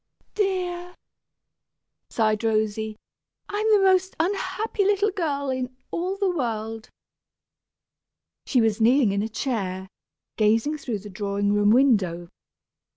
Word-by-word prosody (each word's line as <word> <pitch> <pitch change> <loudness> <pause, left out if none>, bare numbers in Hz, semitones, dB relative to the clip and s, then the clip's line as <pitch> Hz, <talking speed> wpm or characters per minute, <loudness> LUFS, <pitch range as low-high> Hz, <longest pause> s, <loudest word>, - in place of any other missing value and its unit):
dear," 360 -3 -2 1.1
sighed 215 -1 +1
Rosy, 220 -1 0 0.5
"I'm 425 +2 -1
the 410 -2 +5
most 375 0 +3
unhappy 405 +4 -1
little 410 +1 +2
girl 285 -7 -2
in 255 0 -4
all 370 +3 -2
the 390 -3 0
world." 225 -4 -3 1.6
She 255 - +3
was 225 0 +1
kneeling 240 -1 +4
in 200 0 0
a 220 - -3
chair, 195 -6 -3 0.5
gazing 225 +8 +2
through 240 -6 -3
the - - -7
drawing 200 0 -1
room 205 0 +3
window. 200 -9 +3
245 Hz, 115 wpm, -24 LUFS, 215-360 Hz, 1.6 s, the